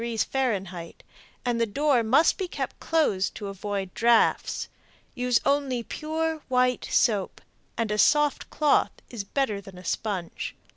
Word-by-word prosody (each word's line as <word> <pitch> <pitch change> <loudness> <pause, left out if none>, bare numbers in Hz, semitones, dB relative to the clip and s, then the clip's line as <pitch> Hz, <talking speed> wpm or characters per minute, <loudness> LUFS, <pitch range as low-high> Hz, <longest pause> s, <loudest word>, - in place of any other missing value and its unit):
F., 235 +1 -2 1.1
and 240 -1 0
the 230 - +2
door 280 +3 +2
must 260 - +3
be 380 - -1
kept - - -5
closed 255 -13 +1
to 205 - -5
avoid 195 -1 -4
drafts. 235 0 +2 0.5
Use 250 -2 +2
only 275 -4 +1
pure 315 +5 -3
white 250 -1 +2
soap, 210 -6 +1 0.4
and 225 -2 -1
a 210 - -1
soft 295 +2 +3
cloth 300 -1 +3 0.2
is 230 -5 -4
better 210 -2 -1
than 195 -2 -13
a 180 - -12
sponge. 190 -4 -3
235 Hz, 140 wpm, -26 LUFS, 205-285 Hz, 1.1 s, must